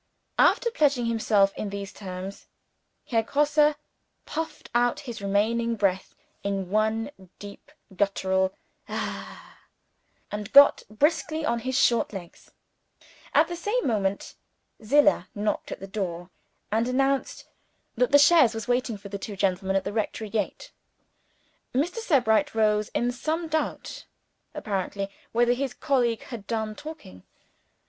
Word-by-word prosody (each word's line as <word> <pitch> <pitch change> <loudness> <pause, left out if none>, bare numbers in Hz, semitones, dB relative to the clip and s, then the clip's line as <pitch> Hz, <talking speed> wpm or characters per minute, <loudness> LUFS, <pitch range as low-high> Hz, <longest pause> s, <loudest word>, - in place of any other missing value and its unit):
After 470 - +4
pledging 285 - +2
himself 215 -4 +2
in 210 - -4
those 200 -1 -6
terms, 190 0 -8 0.6
Herr 230 -2 +1
Grosse 295 +4 +3 0.5
puffed 320 -1 -5
out 240 0 +2
his 240 -6 -7
remaining 225 +4 +1
breath 195 -3 -1 0.3
in 195 -2 -3
one 220 +4 +1 0.3
deep 205 +7 -11 0.2
guttural 190 -1 +1 0.4
"Hah!" - - -6 0.7
and 210 -1 -5
got 280 +1 +8
briskly 310 +6 0
on 235 -3 0
his 260 +2 -2
short 235 -2 +2
legs. 175 -4 -10 0.9
At - - +6
the 350 - -5
same 420 +8 -1
moment, 200 -4 -1 0.5
Zillah 290 +6 +4
knocked 210 +1 -2
at - - -5
the 195 - -7
door, 185 -3 -4 0.4
and 225 +2 +1
announced 270 +2 0 0.5
that 250 +3 +1
the 285 - +8
chaise 285 -6 +6
was 225 - -5
waiting 245 -2 0
for 200 0 -11
the 200 0 -5
two 205 +1 -6
gentlemen 190 0 0
at 195 - +2
the 200 - -4
rectory 215 -1 -3
gate. 220 - -3 1.0
Mr. 315 - 0
Sebright 285 - +2
rose 215 -1 +2
in 240 +1 +1
some 315 +7 -2
doubt, 315 0 -3 0.5
apparently, 195 -1 -3 0.2
whether 240 +1 +3
his 265 +1 -3
colleague 245 -6 +1
had 225 -5 -9
done 220 -2 -2
talking. 255 - -10
225 Hz, 135 wpm, -26 LUFS, 200-275 Hz, 1.0 s, got